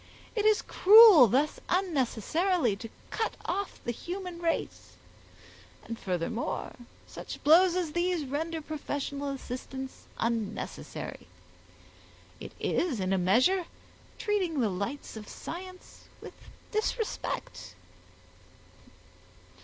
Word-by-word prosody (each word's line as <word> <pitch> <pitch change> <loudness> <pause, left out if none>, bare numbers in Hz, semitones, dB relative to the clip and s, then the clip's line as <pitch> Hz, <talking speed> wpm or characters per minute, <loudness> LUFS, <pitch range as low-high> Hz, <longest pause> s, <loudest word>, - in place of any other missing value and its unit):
It 425 -2 0
is 430 -1 +4
cruel 410 - +9
thus 275 +8 +1
unnecessarily 325 - +1
to 225 +2 -8 0.2
cut 445 - -2
off 400 0 -3
the 240 - -2
human 355 - -6
race, 330 -1 -2 0.9
and 230 - -6
furthermore, 185 +5 -3 0.3
such - - -9
blows 345 +4 +6
as 350 -4 -1
these 345 -2 0
render 320 +4 -3
professional 285 -2 -4
assistance 265 0 -7
unnecessary; 230 -3 -4 1.1
it - - -9
is 310 - 0
in 190 0 0
a 190 - +2
measure 255 - +3 0.5
treating 375 -8 0
the 225 -4 +2
lights 200 +11 -4
of 210 -1 -9
science 365 +1 -9
with - - -10 0.4
disrespect." 435 +1 -3
310 Hz, 100 wpm, -29 LUFS, 240-365 Hz, 1.1 s, cruel